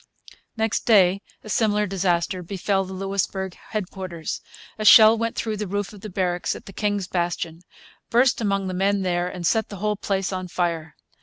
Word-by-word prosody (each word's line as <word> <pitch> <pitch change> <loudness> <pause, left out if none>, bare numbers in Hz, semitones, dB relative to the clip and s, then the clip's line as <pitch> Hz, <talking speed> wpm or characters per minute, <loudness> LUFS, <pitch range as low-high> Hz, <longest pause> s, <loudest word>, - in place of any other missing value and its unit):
Next 220 0 -1
day 195 -4 +5 0.2
a - - -11
similar 210 0 +2
disaster 180 -2 0
befell 195 +2 -1
the 190 - -8
Louisbourg 190 -1 -2
headquarters. 185 -6 -5 0.4
A - - -2
shell 215 +1 +9
went 230 0 -2
through 220 -2 -2
the 210 0 -3
roof 205 +2 -3
of 205 - -12
the 215 - -7
barracks 180 -2 -1
at - - -11
the 195 - -11
King's 205 -2 -1
Bastion, 170 -2 -2 0.5
burst 245 +1 +3
among 195 -2 0
the 185 - -3
men 195 +1 +1
there, 175 -1 0
and 180 -1 -6
set 220 +6 +1
the 205 - -7
whole 210 +2 0
place 195 -1 -1
on 185 -1 -4
fire. 170 -3 -2
195 Hz, 180 wpm, -24 LUFS, 180-210 Hz, 0.5 s, shell